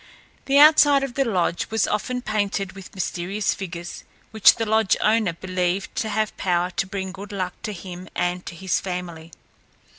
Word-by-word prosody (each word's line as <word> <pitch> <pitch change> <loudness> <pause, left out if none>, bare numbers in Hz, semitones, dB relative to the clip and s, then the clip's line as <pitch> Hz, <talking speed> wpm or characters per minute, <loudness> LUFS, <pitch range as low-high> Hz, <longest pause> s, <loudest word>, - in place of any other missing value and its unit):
The 275 +1 +3
outside 290 -2 +7
of 270 -3 -4
the 275 - +1
lodge 185 -7 -1
was 225 0 +1
often 250 +4 -2
painted 205 -3 -1
with 190 +1 -12
mysterious 190 +2 -2
figures 175 -2 -7 0.3
which 220 -2 +6
the 225 - -2
lodge 220 -2 +2
owner 215 -5 +2
believed 185 +2 -2
to 220 - -1
have 215 0 -1
power 180 -1 0
to 195 - -2
bring 190 -1 -4
good 195 +2 -9
luck 185 -3 -3
to 215 - -4
him 180 -1 -9
and 180 0 -1
to - - -6
his 190 0 -1
family. 175 -3 -6
195 Hz, 175 wpm, -23 LUFS, 180-220 Hz, 0.3 s, outside